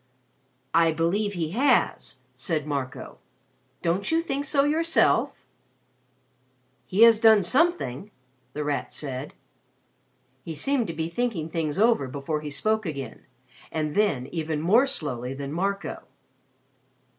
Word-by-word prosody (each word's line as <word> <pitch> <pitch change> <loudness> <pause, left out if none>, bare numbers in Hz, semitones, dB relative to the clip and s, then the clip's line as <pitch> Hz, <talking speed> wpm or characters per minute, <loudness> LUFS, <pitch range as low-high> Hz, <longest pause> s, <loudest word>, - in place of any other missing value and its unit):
"I 165 -1 +4
believe 195 +6 0
he 165 -4 -3
has," 255 +5 +1 0.2
said 150 +4 -2
Marco. 140 -4 -5 0.6
"Don't 175 - 0
you 325 - +3
think 285 -4 -3
so 275 0 +2
yourself?" 325 +3 +1 1.4
"He 200 +5 +4
has 230 -2 +7
done 220 -3 +6
something," 235 - +1 0.4
The 150 - -3
Rat 145 -1 -2
said. 135 -1 -5 1.1
He 160 - -6
seemed 250 - 0
to 165 - -4
be 160 0 -3
thinking 170 -4 -2
things 160 -2 -2
over 220 - +3
before 140 +3 -3
he 150 - -5
spoke 220 +9 0
again 140 -4 -7 0.4
and 155 -2 -2
then 200 -12 +1
even 160 -2 -2
more 215 - +4
slowly 130 - -3
than 140 +1 -6
Marco. 195 +3 -2
170 Hz, 125 wpm, -25 LUFS, 150-225 Hz, 1.4 s, has